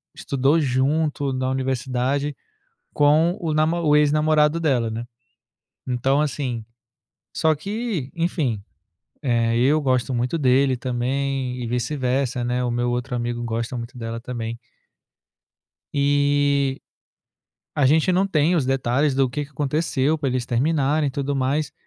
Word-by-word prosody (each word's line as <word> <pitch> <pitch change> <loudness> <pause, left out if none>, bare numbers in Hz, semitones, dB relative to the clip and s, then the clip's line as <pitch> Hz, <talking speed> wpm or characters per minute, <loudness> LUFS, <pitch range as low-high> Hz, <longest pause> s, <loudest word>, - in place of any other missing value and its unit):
estudou 140 +4 +1
junto 140 +1 0
na 130 0 -1
universidade 130 +2 -1 0.6
com 155 +4 +3
o 160 -3 -2
namo 155 +2 +2
o 150 -1 +4
ex-namorado 150 +1 +3
dela, 130 -8 +1
né, 115 +2 -5 0.8
então, 135 +3 +1
assim 130 -6 -2 0.7
só 160 -1 +2
que, 200 - -4
enfim, 155 - -1 0.6
eh, 115 -3 +1
eu 140 +6 +3
gosto 130 -2 0
muito 125 +7 -1
dele 135 -1 +3
também 130 +1 -2
e - - -3
vice-versa, 125 +1 -1
né. 125 +1 -1
O 120 - 0
meu 120 0 0
outro 125 +1 -2
amigo 120 0 -2
gosta 115 +2 -3
muito 120 +1 -7
dela 115 0 -4
também. 115 -2 -5 1.4
Eh, 140 -1 +2 1.0
a 145 - +4
gente 160 +6 +3
não 190 +2 +2
tem 170 -1 +2
os 140 - +1
detalhes 135 +2 +1
do 135 -1 +2
que 145 +4 -3
que 140 - -16
aconteceu 150 +1 0
para 140 - -1
eles 125 -1 -1
terminarem 145 +4 +1
e - - 0
tudo 140 +1 -2
mais. 135 +3 0
135 Hz, 135 wpm, -23 LUFS, 125-150 Hz, 1.4 s, o